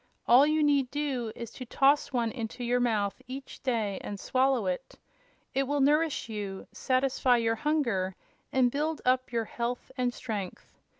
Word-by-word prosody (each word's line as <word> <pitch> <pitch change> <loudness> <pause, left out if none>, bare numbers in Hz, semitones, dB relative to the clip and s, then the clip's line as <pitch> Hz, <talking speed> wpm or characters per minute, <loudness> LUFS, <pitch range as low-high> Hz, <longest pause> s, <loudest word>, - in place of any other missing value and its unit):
All 260 +5 +7
you 310 0 +2
need 280 -3 +3
do 265 -6 -2
is 235 -2 -7
to 255 - -8
toss 280 +4 +3
one 235 -3 0
into 235 0 -5
your 245 +1 +1
mouth 220 -2 0
each 265 +1 -8
day 220 -7 -1
and 205 -1 -5
swallow 260 -2 +1
it. 185 +8 -3 0.6
It 270 0 +1
will 290 +1 0
nourish 300 +1 +2
you, 205 -3 -5
satisfy 255 -1 +2
your 230 -1 +1
hunger 235 -11 0 0.4
and 255 -2 +3
build 305 +3 -2
up 255 0 +2
your 230 -2 0
health 240 +3 -4
and 250 -1 +2
strength. 205 -6 -6
250 Hz, 165 wpm, -29 LUFS, 225-275 Hz, 0.6 s, All